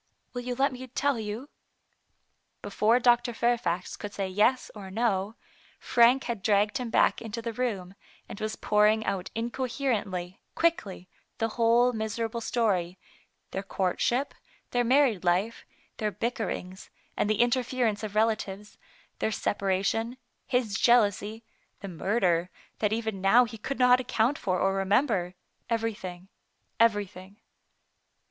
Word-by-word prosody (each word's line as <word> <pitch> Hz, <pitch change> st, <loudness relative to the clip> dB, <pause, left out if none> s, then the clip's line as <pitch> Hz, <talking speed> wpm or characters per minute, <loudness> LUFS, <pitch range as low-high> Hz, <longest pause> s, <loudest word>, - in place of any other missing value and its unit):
" -, -, -47 dB
Will 245 Hz, -, -4 dB
you 245 Hz, 0 st, -4 dB
let 275 Hz, +2 st, +2 dB
me 260 Hz, 0 st, -8 dB
tell 275 Hz, 0 st, 0 dB
you? 220 Hz, +5 st, -5 dB, 0.6 s
" -, -, -47 dB
Before 215 Hz, +4 st, +2 dB
Dr. 240 Hz, -1 st, +3 dB
Fair 240 Hz, +1 st, +2 dB
fax 180 Hz, -6 st, -3 dB
could 205 Hz, -, -7 dB
say 195 Hz, -1 st, -2 dB
"Yes," 210 Hz, +7 st, +1 dB
or 200 Hz, -3 st, -9 dB
"No, 205 Hz, -1 st, -1 dB, 0.4 s
Frank 245 Hz, +3 st, +4 dB
had 235 Hz, -4 st, -4 dB
dragged 205 Hz, +2 st, +2 dB
him 245 Hz, -2 st, -4 dB
back -, -, +3 dB
into 225 Hz, 0 st, -5 dB
the 230 Hz, 0 st, -4 dB
room, 205 Hz, -7 st, -3 dB, 0.3 s
and -, -, -9 dB
was 215 Hz, 0 st, -2 dB
pour 210 Hz, 0 st, +3 dB
ing 220 Hz, +1 st, +1 dB
out 185 Hz, -2 st, -2 dB
incoherently, 230 Hz, -6 st, -2 dB, 0.2 s
quickly, 205 Hz, -, 0 dB, 0.3 s
the 225 Hz, -, 0 dB
whole 235 Hz, +2 st, +3 dB
miserable 225 Hz, +1 st, -3 dB
story; 190 Hz, -7 st, 0 dB, 0.5 s
their 195 Hz, -, -3 dB
courtship, 200 Hz, +7 st, -1 dB, 0.4 s
their 245 Hz, 0 st, +2 dB
married 250 Hz, -6 st, +3 dB
life, 185 Hz, +6 st, 0 dB, 0.3 s
their 215 Hz, -, -1 dB
bickerings, 205 Hz, -3 st, -4 dB, 0.3 s
and 205 Hz, -, 0 dB
the 215 Hz, -, +1 dB
interference 240 Hz, -3 st, +1 dB
of 210 Hz, -1 st, -6 dB
relatives, 210 Hz, -2 st, -1 dB, 0.4 s
their 220 Hz, -, 0 dB
separation, 200 Hz, +5 st, -1 dB, 0.3 s
his 245 Hz, -5 st, 0 dB
jealousy, 220 Hz, -2 st, +2 dB, 0.4 s
the 200 Hz, -, -6 dB
murder 180 Hz, -1 st, 0 dB, 0.3 s
that 210 Hz, -1 st, +1 dB
even 220 Hz, -3 st, -2 dB
now 230 Hz, +6 st, +6 dB
he 230 Hz, -, -8 dB
could 275 Hz, +6 st, -4 dB
not 250 Hz, 0 st, +5 dB
account 250 Hz, +1 st, 0 dB
for 185 Hz, -2 st, -1 dB
or 195 Hz, 0 st, +2 dB
remember 195 Hz, -2 st, +1 dB, 0.2 s
— -, -, -45 dB
everything, 205 Hz, -6 st, -3 dB, 0.5 s
everything. 205 Hz, -3 st, 0 dB
220 Hz, 140 wpm, -28 LUFS, 195-240 Hz, 0.6 s, now